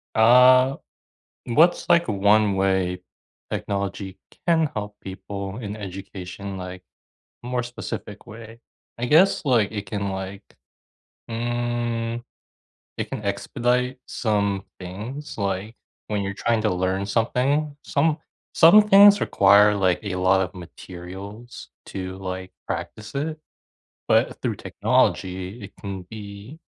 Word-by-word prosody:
Uh, 125 +3 +6 0.7
what's 160 +9 +3
like 170 0 +4
one 105 0 +3
way 95 -2 0 0.5
technology 100 -1 -3 0.3
can 165 -2 +4
help 105 -2 -5
people 100 +1 -6
in 105 -4 -5
education, 95 -1 -7
like, 90 0 -8 0.6
more 125 0 -1
specific 115 -3 -7
way? 115 0 -11 0.4
I 120 - -1
guess, 165 +9 +4
like, 120 -7 +3
it 105 -2 -5
can 100 +1 -3
like, 95 +1 -6 0.9
mm, 120 0 -2 0.8
it - - -3
can - - -5
expedite 125 +1 -1
some 100 -3 -1
things, 115 +11 -7
like, 100 +2 -3 0.3
when 105 -1 -1
you're 100 0 -4
trying 115 +1 +1
to 110 - +1
learn 95 +2 -1
something. 135 +7 0
Some 155 +2 +1 0.4
some 170 +6 +8
things 200 0 +8
require, 100 +1 +5
like, 95 -3 +2
a 100 -3 -3
lot 95 +1 +3
of 90 -1 -3
materials 95 +6 -10 0.2
to, 95 -1 -5
like, 95 -1 -6 0.2
practice 105 0 -5
it, 155 +3 -2 0.7
but - - +2
through - - -1
technology, 95 +4 0
it 100 - -9
can 100 -3 -5
be 105 +6 -9
105 Hz, 120 wpm, -23 LUFS, 95-120 Hz, 0.9 s, some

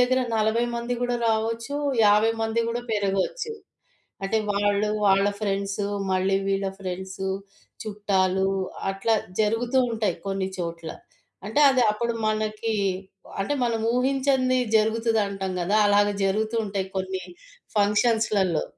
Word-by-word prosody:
దగ్గర 255 +1 +3 0.2
40 220 +2 +2
మంది 235 +1 -2
గూడా 245 0 0
రావచ్చు, 225 +4 -1 0.3
50 210 +2 +5
మంది 225 +1 0
గూడా 240 +1 -2
పెరగొచ్చు. 205 - -1 0.7
అంటే 195 +3 +1
వాళ్ళు, 205 +1 +1 0.2
వాళ్ళ 195 0 +4
ఫ్రెండ్స్, 200 -1 -1 0.3
మళ్ళీ 190 +1 +2
వీళ్ళ 195 0 0
ఫ్రెండ్స్ 190 0 -6 0.6
చుట్టాలు 195 -3 +1 0.4
అట్లా 195 +4 0 0.3
జరుగుతూ 225 +4 +1
ఉంటాయి 220 -2 0
కొన్ని 195 -1 -1
చోట్ల. 170 -2 -5 0.6
అంటే 220 +7 0
అది 260 -2 +3
అప్పుడు 235 +2 -2
మనకి 215 +1 -1 0.7
అంటే 195 +9 0
మనం 230 -2 0
ఊహించంది 260 0 +2 0.2
జరుగుతది 225 +1 +2
అంటాం 195 -1 -4
గదా! 190 +4 +1
అలాగ 205 0 +4 0.2
జరుగుతూ 215 +4 0
ఉంటాయి 195 -2 -3
కొన్ని 190 0 -3 0.5
ఫంక్షన్స్‌లలో. 210 -4 +2
210 Hz, 120 wpm, -25 LUFS, 195-230 Hz, 0.7 s, 50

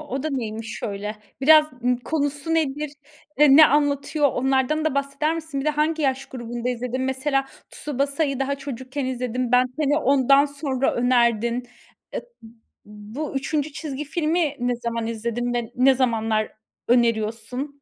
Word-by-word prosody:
O 275 -3 -5
da 310 - -2
neymiş 225 -4 -4
öyle? 210 +1 -4 0.2
Biraz 305 +2 +6
Imm, 250 0 +2
konusu 290 +4 -2
nedir? 300 -2 -1 0.5
Eee, 290 -2 +7
ne 310 0 +10
anlatıyor? 290 +1 +2
Onlardan 265 +4 +1
da 315 - 0
bahseder 280 +3 0
misin? 320 -4 -4
Bir 275 - -4
de - - +4
hangi 305 +2 0
yaş 270 -1 0
grubunda 240 -2 -5
izledin? 250 +1 -2
Mesela 270 +1 0 0.2
Tsubasa'yı 280 0 -1
daha 275 +1 0
çocukken 270 0 -5
izledin. 250 -1 -2
Ben 250 0 +5
10'i 295 -1 +1
ondan 275 0 +4
sonra 280 -2 -1
önerdin. 240 0 +1 0.5
E - - -1
b - - -20 0.6
bu 210 +9 -7
3. 290 +2 -1
çizgi 300 -2 -5
filmi 315 -1 0
ne 245 0 0
zaman 235 -1 -3
izledin 235 +2 -2
ve 240 -1 -3
ne 260 +2 +5
zamanlar 225 -4 0 0.4
öneriyorsun? 235 +4 0
265 Hz, 150 wpm, -23 LUFS, 240-290 Hz, 0.6 s, ne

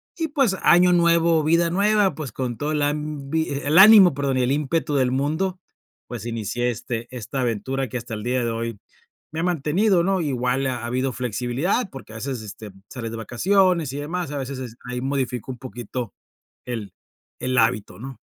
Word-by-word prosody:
Y 325 -2 -2
pues, 270 -10 +1
año 180 +1 +5
nuevo, 170 -2 +4
vida 170 +2 +3
nueva, 205 +1 +3
pues, 150 -6 -6
con 125 +1 -3
toda 150 +5 -2
el 150 -1 +1
ambi 150 +1 -2
el 145 +4 +2
ánimo 200 -4 +9
perdón 135 -1 -1
y 130 - +2
el 125 - +1
ímpetu 150 +2 0
del 130 -2 +3
mundo, 160 +8 -1 0.5
pues, 120 -2 -6
inicié 115 +1 -2
este 115 0 -4
esta 130 +3 -4
aventura 130 +3 -1
que 125 - -3
hasta 115 -1 -7
el 105 - -4
día 125 +1 0
de 115 - -1
hoy 115 -2 -4 0.5
me 160 - -3
ha - - -1
mantenido, 175 +3 +2
¿no? 190 0 +1
Igual 130 -2 0
ha 125 -2 -3
habido 130 +2 -1
flexibilidad 125 - -1
porque 135 -5 -11
a - - -7
veces, 125 +1 -4
este, 105 0 -9 0.2
sales 115 -3 -6
de 115 - -5
vacaciones 170 - +2
y - - -4
demás, 170 +3 -3
a 145 - -3
veces 135 -1 -5
es 120 -3 -7
ahí 125 0 -4
modifico 130 -3 -2
un 125 - -7
poquito 120 -2 -6 0.5
el 110 -6 -5 0.5
el 130 0 -1
hábito, 115 -5 +1
¿no? 130 +2 -8
135 Hz, 190 wpm, -23 LUFS, 120-165 Hz, 0.5 s, ánimo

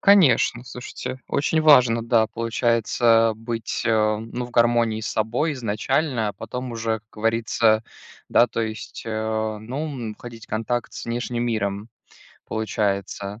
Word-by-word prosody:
Конечно, 135 - +5
слушайте, 125 +1 -7
очень 155 +3 +1
важно, 125 -7 +6
да, 115 -1 +3
получается, 115 0 +2
быть, 115 0 -4
э, 110 -1 +3
ну, 115 +3 -5
в - - -14
гармонии 120 -2 +2
с 110 - -4
собой 120 +9 0
изначально. 125 +2 -1
А - - -3
потом 125 +3 -6
уже, 115 -1 -1
как 105 - -30
говорится, 115 0 +2 0.4
да, 120 - +5
то 115 - -3
есть, 110 +1 -5
э, 110 0 -2
ну, 120 +5 -7 0.3
м, 105 - -6
входить 115 -2 -10
в - - -49
контакт 115 +2 -2
с - - -7
внешним 120 0 -2
миром, 105 -2 -2 0.6
получается. 100 -1 -2
115 Hz, 145 wpm, -23 LUFS, 110-120 Hz, 0.6 s, важно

